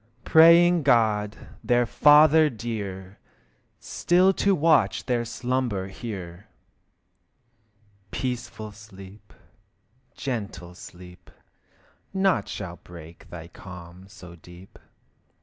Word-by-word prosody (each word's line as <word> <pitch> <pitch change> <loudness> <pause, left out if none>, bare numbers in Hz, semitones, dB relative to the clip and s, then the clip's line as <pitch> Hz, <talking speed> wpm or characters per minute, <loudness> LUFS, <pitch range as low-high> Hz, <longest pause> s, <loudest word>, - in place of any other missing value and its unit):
Praying 170 +2 +6
God, 110 -6 +1 0.3
their 120 0 +2
Father 150 +4 +5
dear, 100 -5 -7 0.6
Still 185 +2 +1
to 200 +1 +1
watch 145 - +1
their 120 -2 -1
slumber 120 -5 -3
here. 95 -3 -9 1.6
Peaceful 120 -3 -5
sleep, 105 -1 -15 0.8
gentle 100 -9 -6
sleep, 90 0 -14 0.9
Naught 190 -1 +1
shall 90 -3 -7
break 85 -1 -14
thy 85 -2 -10
calm 90 +1 -13
so 90 -3 -14
deep. 90 +3 -16
105 Hz, 85 wpm, -24 LUFS, 90-130 Hz, 1.6 s, Praying